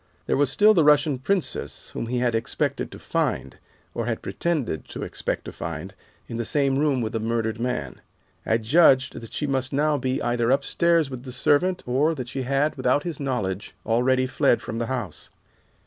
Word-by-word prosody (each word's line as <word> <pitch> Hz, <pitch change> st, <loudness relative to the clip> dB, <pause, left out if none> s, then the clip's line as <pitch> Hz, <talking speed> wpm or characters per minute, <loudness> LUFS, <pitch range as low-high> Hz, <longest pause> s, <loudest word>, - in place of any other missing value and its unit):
There -, -, +1 dB
was 145 Hz, -1 st, +2 dB
still 215 Hz, +6 st, +6 dB
the 170 Hz, -6 st, +4 dB
Russian 145 Hz, -2 st, +4 dB
princess 185 Hz, +6 st, -2 dB
whom -, -, -4 dB
he 125 Hz, +1 st, -1 dB
had 120 Hz, -1 st, +1 dB
expected 115 Hz, -, -1 dB
to -, -, -9 dB
find, 65 Hz, 0 st, -2 dB, 0.3 s
or -, -, -3 dB
had -, -, -2 dB
pretended 145 Hz, -, -2 dB
to -, -, -6 dB
expect -, -, -3 dB
to -, -, -6 dB
find, 85 Hz, +3 st, -6 dB, 0.3 s
in 115 Hz, -, -5 dB
the 115 Hz, -, -1 dB
same 135 Hz, +2 st, +1 dB
room 145 Hz, -4 st, +2 dB
with 110 Hz, -1 st, -3 dB
the 115 Hz, -, -1 dB
murdered 110 Hz, 0 st, -1 dB
man. 115 Hz, -, -3 dB, 0.4 s
I 110 Hz, -, +2 dB
judged 130 Hz, +2 st, +4 dB
that 115 Hz, -, -10 dB
she 150 Hz, -, -2 dB
must 130 Hz, -2 st, -1 dB
now 150 Hz, +1 st, +1 dB
be 130 Hz, +1 st, -1 dB
either 120 Hz, -1 st, 0 dB
upstairs 150 Hz, +3 st, +2 dB
with 130 Hz, -2 st, -6 dB
the 130 Hz, 0 st, -8 dB
servant, 175 Hz, +8 st, +2 dB
or 145 Hz, +6 st, +1 dB
that 125 Hz, -4 st, -6 dB
she 135 Hz, +1 st, -3 dB
had, 140 Hz, +4 st, 0 dB
without 130 Hz, +2 st, +2 dB
his 170 Hz, -5 st, -5 dB
knowledge, 105 Hz, -9 st, -3 dB
already 130 Hz, +3 st, +2 dB
fled 130 Hz, -1 st, +2 dB
from 115 Hz, -, -5 dB
the 115 Hz, -, -2 dB
house. 120 Hz, -, -5 dB
130 Hz, 195 wpm, -24 LUFS, 115-145 Hz, 0.4 s, still